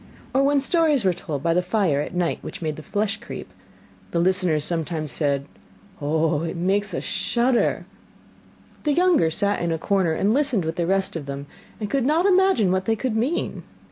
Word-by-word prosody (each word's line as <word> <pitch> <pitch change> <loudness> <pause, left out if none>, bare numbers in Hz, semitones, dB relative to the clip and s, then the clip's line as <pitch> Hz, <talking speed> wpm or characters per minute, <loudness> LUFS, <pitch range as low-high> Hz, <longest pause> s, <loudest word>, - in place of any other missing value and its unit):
Or 265 - +3
when 280 +1 +3
stories 300 - +2
were 185 - +4
told 145 -4 -5
by 165 - +2
the 180 - +3
fire 180 -6 +1
at 165 - -6
night 175 -2 0
which - - -7
made 155 -3 -3
the 155 - -9
flesh 205 +6 -1
creep, - - -9 0.6
the - - -2
listeners 175 -4 +2
sometimes 160 -2 -2
said: 140 0 0 0.6
'Oh, 155 +1 +1
it 165 0 -3
makes 195 +4 0
us - - -3
shudder!' 240 0 +1 1.0
The 295 - +2
younger 350 - +3
sat 200 +5 0
in 170 -1 0
a 165 - 0
corner 185 -1 +1
and 200 +6 +1
listened 260 - +1
with 160 +1 -3
the 170 -1 0
rest 195 0 +1
of 150 -4 -5
them, 140 0 -5 0.3
and 210 - -3
could 270 +4 0
not 310 +7 +2
imagine 380 - +4
what 185 0 0
they 225 - +2
could 235 0 -2
mean. 255 +10 -1
190 Hz, 195 wpm, -23 LUFS, 160-240 Hz, 1.0 s, were